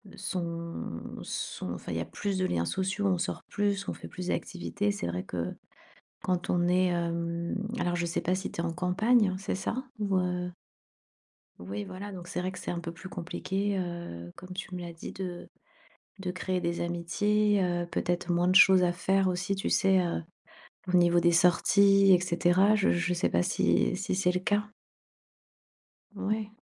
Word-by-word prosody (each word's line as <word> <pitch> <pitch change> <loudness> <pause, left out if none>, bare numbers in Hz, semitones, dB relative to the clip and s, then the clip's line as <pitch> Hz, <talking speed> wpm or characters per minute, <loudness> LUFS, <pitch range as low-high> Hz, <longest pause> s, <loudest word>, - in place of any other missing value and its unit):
sont 170 - -4 0.2
sont, 90 - -4
enfin 85 0 -7
il 80 - -1
y - - -1
a - - -3
plus 200 - -3
de 185 - +1
liens 85 - 0
sociaux, 190 - -1
on 185 -2 +2
sort 175 - -3
plus, 200 -1 0
on - - -1
fait - - -9
plus 180 -1 -7
d'activités, 200 +3 -1
c'est 205 - -3
vrai 90 +1 -3
que, 90 -2 -4 0.7
quand 180 -1 -1
on 175 0 +2
est, 185 +1 +4
hem 170 0 -2 0.2
alors 175 -3 0
je 175 0 -1
sais 170 - -1
pas 180 - 0
si 190 - -4
tu - - -5
es - - -1
en 165 - -1
campagne, 195 +4 +3
c'est 195 - -3
ça? 235 +7 -3
Ou 200 -2 0
heu 180 -1 -1 1.1
Oui 100 +3 -5
voilà, 195 - -7
donc 180 -3 -8
c'est 180 - -3
vrai 185 +1 -2
que 185 - -9
c'est - - -4
un 170 - -3
peu 170 0 -5
plus 170 +3 -10
compliqué, 190 +2 -2
heu, 170 - -5
comme 185 +1 -10
tu 185 0 -6
me 180 - -4
l'as 170 -1 -6
dit 165 - -8
de 180 -2 -6 0.7
de 180 -1 -2
créer 185 0 -2
des 170 0 -2
amitiés, 205 +5 +1
heu, 175 -1 -1
peut-être 175 +1 -2
moins 175 0 +2
de 185 - +3
choses 190 -1 +8
à 175 - +2
faire 190 +2 +1
aussi, 180 +1 0
tu 195 - -2
sais? 190 0 +4
Heu, 175 -2 -1 0.7
au - - +7
niveau 175 0 +5
des 175 0 +4
sorties 195 +3 +5
et 180 - +6
cetera. 185 +3 +3
Je 200 -1 +3
je 175 +1 +1
sais 175 - +1
pas 85 - +2
si - - +2
si - - -2
c'est 185 -1 +2
le 180 - -1
cas? 205 +3 +1 1.5
Ouais. 215 +1 -2
180 Hz, 195 wpm, -29 LUFS, 170-195 Hz, 1.5 s, choses